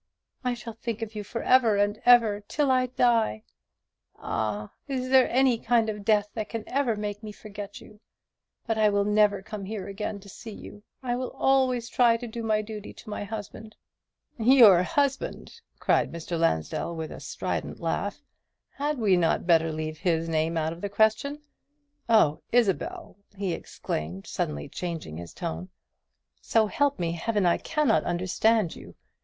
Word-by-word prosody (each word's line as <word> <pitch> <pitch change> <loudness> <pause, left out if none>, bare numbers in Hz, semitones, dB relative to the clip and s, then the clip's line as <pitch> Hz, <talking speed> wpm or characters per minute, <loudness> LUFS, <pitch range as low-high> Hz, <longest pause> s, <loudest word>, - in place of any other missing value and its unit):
I 250 -1 0
shall 230 0 -8
think 225 0 -4
of 220 -1 -6
you 210 -1 -5
for 230 +3 -5
ever 240 -5 +4
and 205 +2 +1
ever, 225 -4 +6
till 290 -3 +1
I 255 -1 +3
die. 230 - +2 0.7
Ah, 105 -1 -3 0.2
is 255 -2 -2
there 260 -1 +5
any 255 -2 +3
kind 230 -1 +2
of 210 -1 -5
death 210 -1 +2
that 220 -2 -4
can 230 -2 -4
ever 255 -4 +1
make 205 0 -4
me 215 -1 -7
forget 205 -1 -9
you? 210 - -16 0.7
but 225 -1 -1
I 215 -1 +5
will 200 0 +2
never 210 -2 +3
come 210 0 -7
here 200 -1 -5
again 200 +1 -4
to 200 - -15
see 210 +2 -9
you. 205 - -11 0.2
I 245 -1 -1
will 255 0 -3
always 260 -3 +2
try 235 -1 +4
to 240 - -7
do 235 0 -6
my 215 -1 +1
duty 210 -1 -8
to 215 - -11
my 210 - -3
husband." 215 +1 -8 0.6
"Your 225 -6 +7
husband!" 280 - -2 0.2
cried - - +2
Mr. 170 +1 -5
Lansdell, 165 - 0
with 160 -1 -5
a - - -8
strident - - -4
laugh; - - -2 0.5
"had 290 +1 -2
we 210 -6 +3
not 170 -1 +1
better 165 -2 +4
leave 155 0 -4
his 165 -2 0
name 160 +1 0
out 160 0 0
of 170 - -12
the 205 - -3
question? 220 +8 +1 0.7
Oh, 215 -10 +4
Isabel!" 245 - 0 0.2
he 190 -3 -1
exclaimed, 85 - -5
suddenly 75 -1 -3
changing 165 - -5
his 85 0 -8
tone, 80 +3 -5 0.7
"so 225 -1 +3
help 285 +6 +1
me 170 -1 -1
Heaven, 200 +4 0
I 175 - +3
cannot 300 -8 +1
understand 185 +3 +1
you. - - -12
215 Hz, 170 wpm, -27 LUFS, 175-235 Hz, 0.7 s, Your